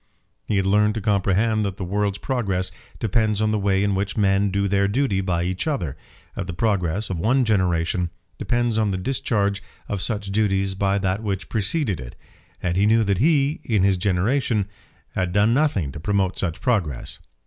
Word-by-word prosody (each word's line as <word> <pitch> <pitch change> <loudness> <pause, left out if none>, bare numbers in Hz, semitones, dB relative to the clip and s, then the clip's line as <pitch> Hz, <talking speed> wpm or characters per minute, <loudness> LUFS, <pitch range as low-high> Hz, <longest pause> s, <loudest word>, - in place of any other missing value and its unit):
He 105 - +1
had 95 - +1
learned 105 +2 +3
to - - -1
comprehend 105 +2 +2
that 100 -2 -3
the - - -4
world's 100 +2 -1
progress 100 -8 -1 0.3
depends 110 -1 +1
on 110 0 +2
the 110 - +1
way 100 -1 +2
in 100 -1 +1
which 100 +2 -2
men 100 -1 +3
do 100 +1 0
their 100 0 +2
duty 105 -3 +1
by 90 -3 0
each 90 - -2
other, 90 - -2 0.4
that - - -4
the 90 - -4
progress 95 0 0
of 90 - -3
one 125 +8 +2
generation 90 -3 +1 0.3
depends 120 -2 0
on 110 -2 +2
the 95 - -1
discharge 100 -2 0 0.3
of 100 -2 -3
such 105 -3 -2
duties 95 -2 +1
by 100 +1 +1
that 95 +1 -1
which 100 -3 -3
preceded 110 - 0
it; - - -9 0.5
and 90 0 0
he 100 +2 +4
knew 110 +1 +4
that 100 -3 0
he, 150 - +2
in 105 -5 +1
his 95 -1 +3
generation, 105 +4 +1 0.5
had 90 -2 -1
done 105 +4 +3
nothing 120 - +1
to 75 - -8
promote 95 +1 0
such 85 -4 -2
progress. 95 - -1
100 Hz, 190 wpm, -23 LUFS, 95-110 Hz, 0.5 s, he